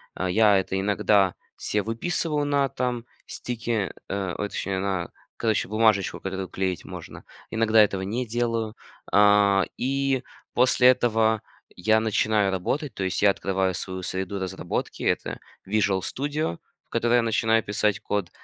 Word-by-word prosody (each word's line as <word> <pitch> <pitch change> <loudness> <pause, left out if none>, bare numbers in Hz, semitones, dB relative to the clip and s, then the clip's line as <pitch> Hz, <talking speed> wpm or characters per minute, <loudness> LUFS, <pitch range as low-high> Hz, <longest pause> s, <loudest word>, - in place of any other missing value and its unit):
Э, 95 0 -2
я 105 0 +5
это 95 0 -2
иногда 100 -1 +3 0.2
се 105 - -1
выписываю 145 - -1
на 140 -1 +2
там, 125 -2 -2 0.2
стике 115 -4 -3 0.2
э, 95 -2 -2
ой, 105 - -2
точнее 100 -1 -3
на, 95 -3 -2 0.3
короче, 110 -2 0
бумажечку, 110 -3 +2
которую 95 0 -4
клеить 95 -2 -2
можно, - - -9 0.3
иногда 110 -1 +4
этого 100 -2 +2
не 115 +6 -2
делаю, 115 -1 -1 0.4
а, 100 -1 +5
и 135 0 0 0.3
после 125 0 +5
этого 110 -3 +2 0.3
я 110 +5 +3
начинаю 110 -2 +1
работать. 135 - -2
То 100 - -4
есть 95 +2 -1
я 100 - +7
открываю 95 -1 -1
свою 95 0 -5
среду 95 +2 -3
разработки- 95 -2 -4
это - - -1 0.3
"Visual 100 -2 +1
Studio", 145 - -2 0.3
в - - -45
которой 120 +1 +2
я 120 - +5
начинаю 115 0 +2
писать 105 -1 0
код, 100 -5 -2
105 Hz, 145 wpm, -25 LUFS, 95-120 Hz, 0.4 s, я